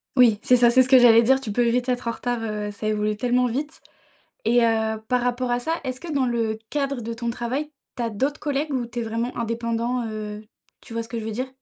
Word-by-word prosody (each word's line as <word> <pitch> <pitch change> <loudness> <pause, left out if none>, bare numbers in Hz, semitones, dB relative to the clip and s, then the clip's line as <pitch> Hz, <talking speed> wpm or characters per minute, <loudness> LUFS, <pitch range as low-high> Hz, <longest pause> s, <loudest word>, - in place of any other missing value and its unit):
Oui, 230 -5 +5
c'est 250 - +4
ça, 240 -1 +5
c'est 260 +1 +6
ce 255 - +1
que 265 - +8
j'allais 235 -2 +7
dire, 265 +3 +4
tu 220 -6 -5
peux 240 +2 +2
vite 250 +2 +1
être 245 -1 -1
en - - +1
retard, 245 0 -3
heu, 210 -2 -3
ça 215 +1 -5
évolue 210 0 0
tellement 250 +2 +2
vite. 285 +6 -3 0.6
Et 235 +1 +4
heu, 220 -1 +1
par 250 -1 +2
rapport 245 0 -1
à 245 - +2
ça, 320 +7 -2
est-ce 255 -1 -5
que 335 -2 -6
dans 270 -3 +1
le 225 -2 -1
cadre 275 -3 -1
de 230 0 -5
ton 235 0 -3
travail, 260 +6 -3 0.3
tu 240 - -3
as 230 - -1
d'autres 270 +8 -1
collègues 290 +1 -2
ou 250 -3 -1
tu 240 +1 -5
es - - -1
vraiment 230 +2 -3
indépendant? 235 +1 -2
Heu, 215 -1 -6 0.4
tu - - -13
vois 230 0 -2
ce 225 - -12
que 230 0 -4
je 220 - -5
veux 220 - -4
dire? 255 +4 -3
240 Hz, 260 wpm, -24 LUFS, 225-255 Hz, 0.6 s, que